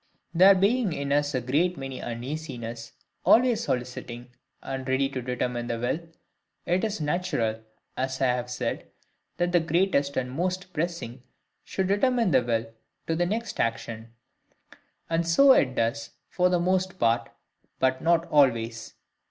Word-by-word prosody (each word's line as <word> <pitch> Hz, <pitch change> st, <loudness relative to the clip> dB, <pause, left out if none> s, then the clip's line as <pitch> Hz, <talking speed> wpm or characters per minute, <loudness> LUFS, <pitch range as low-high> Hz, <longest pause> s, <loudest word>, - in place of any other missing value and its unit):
There 190 Hz, +3 st, +7 dB
being 200 Hz, +1 st, +2 dB
in 140 Hz, -1 st, -3 dB
us 145 Hz, 0 st, +1 dB
a 130 Hz, -, 0 dB
great 155 Hz, +8 st, +1 dB
many 135 Hz, -1 st, -6 dB
uneasinesses, 120 Hz, -2 st, -6 dB, 0.3 s
always 240 Hz, -1 st, +4 dB
soliciting 125 Hz, -2 st, -4 dB, 0.3 s
and 130 Hz, -1 st, -5 dB
ready 130 Hz, +1 st, +2 dB
to 130 Hz, -2 st, -4 dB
determine 125 Hz, -1 st, -2 dB
the 115 Hz, -, -2 dB
will, 125 Hz, +6 st, -1 dB, 0.7 s
it 180 Hz, +3 st, +1 dB
is 215 Hz, -3 st, -1 dB
natural, 145 Hz, -9 st, -1 dB, 0.3 s
as 130 Hz, 0 st, -2 dB
I 135 Hz, -, +2 dB
have 125 Hz, -1 st, 0 dB
said, 125 Hz, -1 st, -3 dB, 0.5 s
that 175 Hz, 0 st, 0 dB
the 175 Hz, -, +4 dB
greatest 160 Hz, -3 st, +1 dB
and 125 Hz, -1 st, -1 dB
most 180 Hz, +5 st, -3 dB
pressing 160 Hz, -7 st, -3 dB, 0.4 s
should 190 Hz, -1 st, -2 dB
determine 230 Hz, +1 st, +2 dB
the 130 Hz, -3 st, +5 dB
will 115 Hz, -1 st, -2 dB, 0.3 s
to 165 Hz, -, -1 dB
the 175 Hz, +1 st, +1 dB
next 225 Hz, +4 st, -3 dB
action; 115 Hz, 0 st, -2 dB, 1.0 s
and 165 Hz, 0 st, 0 dB
so 270 Hz, +12 st, +6 dB
it 130 Hz, -, +2 dB
does 115 Hz, 0 st, -1 dB, 0.2 s
for 180 Hz, 0 st, +2 dB
the 180 Hz, -1 st, +2 dB
most 185 Hz, +1 st, 0 dB
part, 115 Hz, -3 st, +1 dB, 0.5 s
but 130 Hz, 0 st, +1 dB
not 170 Hz, 0 st, +3 dB
always. 115 Hz, -6 st, +2 dB
140 Hz, 150 wpm, -26 LUFS, 120-180 Hz, 1.0 s, There